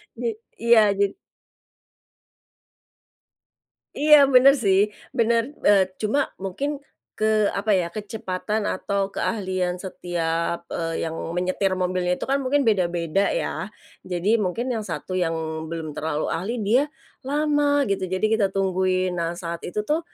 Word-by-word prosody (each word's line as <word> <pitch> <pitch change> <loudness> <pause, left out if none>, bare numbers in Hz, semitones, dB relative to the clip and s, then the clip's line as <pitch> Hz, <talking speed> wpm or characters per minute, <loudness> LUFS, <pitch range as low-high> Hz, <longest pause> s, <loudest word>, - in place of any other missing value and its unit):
Jed 230 -1 -2 0.2
iya 220 -3 +4
jed 200 0 +1 2.8
Iya 300 +1 +7 0.2
benar 265 +2 +8
sih, 195 -1 +4 0.4
benar, 230 0 +3 0.2
eee, 200 -2 +6 0.2
cuma 270 +7 0
mungkin 195 +10 -3 0.5
ke 215 - +1 0.3
apa 210 +2 -1
ya 180 -2 0
kecepatan 210 0 -3
atau 200 0 -1
keahlian 185 -4 -1
setiap, 170 -2 -2
eee, 165 -1 -2
yang 165 0 -4 0.2
menyetir 185 +1 0
mobilnya 180 -1 0
itu - - -16
kan 275 - +3
mungkin 275 +2 +1
beda-beda 180 -4 +1
ya. - - -2 0.4
Jadi 185 +5 +1
mungkin 210 +4 -1
yang 220 - -3
1 185 - -5
yang 165 -2 0 0.3
belum 160 -1 -5
terlalu 155 0 -2
ahli 190 +8 -2
dia 240 +8 +3 0.4
lama 290 0 +1
gitu 195 -5 -1
jadi 185 +3 -2
kita 220 -2 +3
tungguin. 185 -1 0
Nah 170 0 -2
saat 170 -2 -5
itu 210 +4 -3
tuh, 305 +7 +1
195 Hz, 130 wpm, -24 LUFS, 180-230 Hz, 2.8 s, benar